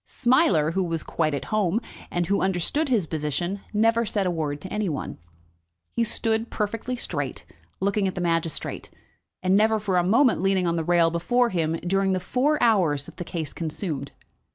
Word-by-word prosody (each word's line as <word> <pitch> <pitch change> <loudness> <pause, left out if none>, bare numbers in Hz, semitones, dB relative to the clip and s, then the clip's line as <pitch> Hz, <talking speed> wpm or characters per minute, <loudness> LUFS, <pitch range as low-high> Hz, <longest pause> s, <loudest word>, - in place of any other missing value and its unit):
Smiler, 185 - +3
who 190 +2 0
was 165 -2 -2
quite 155 -3 0
at - - -4
home, 210 -1 +2 0.3
and 175 0 -1
who 200 +4 +1
understood 190 - 0
his 225 -9 +2
position, 160 +5 -2
never 225 +2 +3
said 205 -3 -1
a 180 - +1
word 150 -4 -2
to 190 - -7
any 210 -2 0
one. 145 - -5 0.7
He 235 - 0
stood, 225 0 0
perfectly 225 +4 -2
straight, 245 - -4 0.3
looking 200 0 +1
at 190 - -3
the - - -3
magistrate, 165 -2 -2 0.5
and 185 +1 +3
never 220 +1 +3
for 200 -3 0
a 175 - +3
moment 235 +8 +3
leaning 195 -1 +2
on 170 -1 +1
the 165 - -1
rail 170 0 +3
before 240 +9 +2
him 165 -5 0
during 195 +1 +2
the 185 - 0
four 255 +11 +1
hours 175 - +3
that - - -13
the - - -4
case 165 -4 -4
consumed. 155 -3 -4
185 Hz, 185 wpm, -25 LUFS, 165-220 Hz, 0.7 s, Smiler